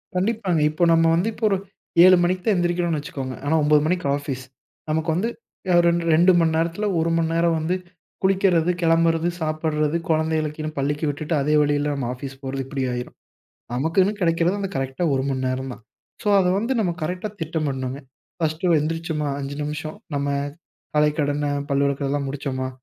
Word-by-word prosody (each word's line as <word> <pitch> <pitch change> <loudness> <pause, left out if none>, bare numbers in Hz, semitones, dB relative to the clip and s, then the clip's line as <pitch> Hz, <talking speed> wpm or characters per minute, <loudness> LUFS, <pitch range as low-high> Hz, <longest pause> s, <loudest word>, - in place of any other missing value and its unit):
கண்டிப்பாங்க. 190 -3 0
இப்போ 155 +3 -1
நம்ம 165 0 +4
வந்து 180 +6 +1
இப்போ 220 +1 -2
ஒரு 195 - +2 0.5
7 185 0 +8
மணிக்கு 180 +1 0
தான் 215 -3 +3
எந்திரிக்கிறோம்னு 175 -2 0
வச்சுக்கோங்க, 135 -3 -5
ஆனா 160 +3 +2
9 150 0 +4
மணிக்கு 180 +1 0
ஆஃபீஸ். 135 -2 -5 0.5
நமக்கு 160 +1 0
வந்து 205 +6 0 0.5
ஆ - - +6
2, 170 0 +2
2 175 +3 +6
மணி 165 -1 +3
நேரத்தில 170 +6 0
1 165 0 +1
மணி 165 - -2
நேரம் 165 0 +2
வந்து 165 +4 0 0.5
குளிக்கிறது, 185 -3 +3
கெளம்புறது, 165 0 +3
சாப்பிடறது, 155 0 0
குழந்தைங்ககீனு 155 -1 0
பள்ளிக்கு 145 +3 -1
விட்டுட்டு, 155 +3 -3
அதே 150 +2 +1
வழியில 145 0 +1
நாம 135 -4 -3
ஆஃபீஸ் 135 +1 -7
போறது 135 0 -3
இப்படி 135 -1 -3
ஆயிரும். 125 0 -5 0.6
நமக்குன்னு 165 +10 +2
கெடைக்கிறது 170 +3 +2
அந்த 195 -1 -2
கரெக்ட்டா 135 +4 -2
1 135 +1 0
மண் 130 0 -2
நேரம் 130 0 -3
தான். 115 - -15 0.4
சோ - - -3
அதை 180 -1 +3
வந்து 230 +6 0
நம்ம 180 -5 +1
கரெக்ட்டா 180 +6 -3
திட்டமிடனுங்க. 140 -5 -2 0.4
ஃபர்ஸ்ட்டு 165 +2 +1
எந்திரிச்சோமா 160 -1 -2
5 140 0 -5
நிமிஷம் 155 +4 -5 0.2
நம்ம 140 0 -1 0.7
காலைக்கடன 150 -1 +1 0.2
பல்லுவெழக்குறதெல்லாம் 140 0 0
முடிச்சோமா, 135 -2 -3
155 Hz, 160 wpm, -23 LUFS, 145-175 Hz, 0.7 s, 7